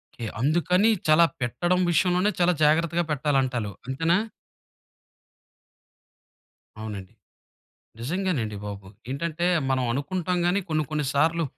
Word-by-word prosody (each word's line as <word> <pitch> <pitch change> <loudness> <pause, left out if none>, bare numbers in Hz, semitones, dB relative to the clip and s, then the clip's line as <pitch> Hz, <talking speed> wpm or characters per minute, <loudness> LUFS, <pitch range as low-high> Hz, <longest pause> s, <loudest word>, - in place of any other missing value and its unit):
కే 115 - -6 0.2
అందుకని 175 - +3 0.2
చాలా 155 +2 +6 0.2
పెట్టడం 175 +9 0
విషయంలోనే, 180 +4 +2
చాలా 180 0 +4
జాగ్రత్తగా 165 +3 +3
పెట్టాలంటారు 130 -6 0 0.2
అంతేనా? 165 +6 +1 2.6
అవునండి. 105 -4 -7 0.9
నిజంగానండి 140 - -2
బాబు. 100 -2 -7 0.2
ఏంటంటే, 170 +4 -2 0.2
మనం 130 -1 +1
అనుకుంటాం 180 +7 -2
కానీ 185 +3 +2
కొన్ని, 155 -1 0
కొన్ని 150 -1 -1
సార్లు 160 +3 +2
155 Hz, 100 wpm, -25 LUFS, 130-175 Hz, 2.6 s, చాలా